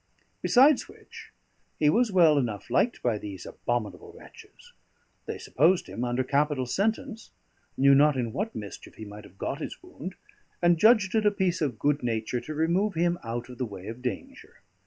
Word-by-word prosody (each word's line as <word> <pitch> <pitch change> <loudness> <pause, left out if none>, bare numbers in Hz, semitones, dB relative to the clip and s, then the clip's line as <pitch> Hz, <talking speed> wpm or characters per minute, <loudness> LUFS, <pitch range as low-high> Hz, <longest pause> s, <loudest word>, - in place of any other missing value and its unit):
Besides 270 +3 +4
which, - - -14 0.5
he 150 - +2
was 235 +2 +2
well 165 -6 +5
enough 115 -3 -4
liked 235 - +1
by 115 -4 +1
these 100 -4 -8
abominable 110 -6 -4
wretches: - - -16 0.5
they - - -4
supposed 170 +7 +2
him 120 - -5
under 125 +1 0
capital 140 0 0
sentence, 220 - -2 0.5
knew 140 +1 +6
not 145 0 +5
in 120 -3 -2
what 215 +4 -3
mischief 105 -2 -8
he 110 - -9
might 105 0 -10
have 95 - -18
got - - -4
his - - -7
wound, - - -8 0.4
and 175 -1 +3
judged 215 -3 +5
it 220 -2 +3
a - - +7
piece 190 -4 -1
of 135 -7 -1
good 145 +5 +1
nature 115 0 -2
to 155 - -7
remove 175 +6 +1
him 175 +1 +1
out 120 +1 -4
of 125 -2 -12
the - - 0
way 100 -4 -9
of 115 +4 -7
danger. 265 - -7
145 Hz, 180 wpm, -27 LUFS, 120-190 Hz, 0.5 s, a